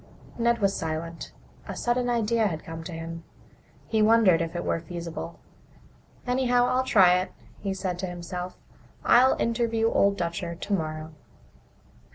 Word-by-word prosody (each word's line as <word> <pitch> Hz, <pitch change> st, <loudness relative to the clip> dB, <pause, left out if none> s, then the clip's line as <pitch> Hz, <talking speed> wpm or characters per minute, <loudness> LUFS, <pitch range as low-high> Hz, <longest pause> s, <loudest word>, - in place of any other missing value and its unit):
Ned 235 Hz, 0 st, +3 dB
was 200 Hz, -3 st, +1 dB
silent. 165 Hz, +1 st, -4 dB, 0.4 s
A -, -, -5 dB
sudden 245 Hz, +1 st, 0 dB
idea 230 Hz, -1 st, +2 dB
had 160 Hz, -5 st, -4 dB
come 165 Hz, 0 st, -7 dB
to 180 Hz, -, -6 dB
him. 165 Hz, 0 st, -6 dB, 0.6 s
He 220 Hz, -1 st, +1 dB
wondered 215 Hz, -6 st, +5 dB
if 165 Hz, +1 st, -3 dB
it 175 Hz, -, -3 dB
were -, -, 0 dB
feasible. 170 Hz, 0 st, -7 dB, 0.9 s
"Anyhow, 245 Hz, -1 st, +2 dB
I'll 255 Hz, +1 st, +2 dB
try 185 Hz, -7 st, +5 dB
it," 185 Hz, -, -4 dB, 0.3 s
he 195 Hz, -1 st, -3 dB
said 185 Hz, -2 st, -3 dB
to 190 Hz, -, -2 dB
himself. 180 Hz, +1 st, -6 dB, 0.5 s
"I'll 255 Hz, +2 st, +6 dB
interview 230 Hz, -1 st, +1 dB
Old 200 Hz, 0 st, +3 dB
Dutcher 170 Hz, -1 st, -3 dB
tomorrow." 160 Hz, -4 st, -3 dB
185 Hz, 145 wpm, -26 LUFS, 170-230 Hz, 0.9 s, I'll